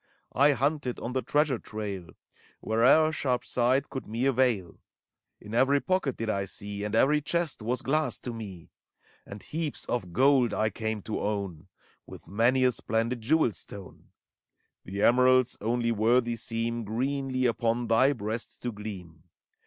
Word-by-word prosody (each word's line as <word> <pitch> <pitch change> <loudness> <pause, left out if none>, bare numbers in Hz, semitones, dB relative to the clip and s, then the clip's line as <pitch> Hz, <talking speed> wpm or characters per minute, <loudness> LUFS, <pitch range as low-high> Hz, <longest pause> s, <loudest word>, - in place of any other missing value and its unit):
I 145 +2 +5
hunted 140 -1 -1
on 125 - -5
the 130 - 0
treasure 145 -3 +1
trail 100 -5 -6 0.5
Where'er 130 +8 +4
sharp 125 -5 -1
sight 130 +3 +1
could 130 -4 -6
me 115 +4 -2
avail: 125 -9 +1 0.6
In 105 - -10
every 135 +4 +4
pocket 185 -5 -1
did 115 - -3
I 100 -2 -1
see. 100 0 -5
And 105 +1 -2
every 150 +6 +4
chest 170 -2 -1
was 120 +3 -2
glass 155 +3 +1
to 120 - -5
me. 100 -7 -9 0.6
And 100 0 -9
heaps 155 -2 -4
of 90 -8 -3
gold 130 +1 +3
I 110 0 +1
came 110 0 -3
to 110 - -3
own. 100 -5 -3 0.4
With - - -12
many 120 +7 +2
a 125 - +4
splendid 115 +1 -2
jewel 145 +1 +2
stone: 100 -1 -10 0.8
The 100 +3 -3
emeralds 125 +1 +4
only 115 +2 0
worthy 115 +2 +2
seem 115 +1 -2
Greenly 130 +4 -1
upon 115 +1 0
thy 115 +5 +4
breast 110 -1 -5
to 120 - -3
gleam. 95 -6 -9
115 Hz, 155 wpm, -28 LUFS, 105-130 Hz, 0.8 s, I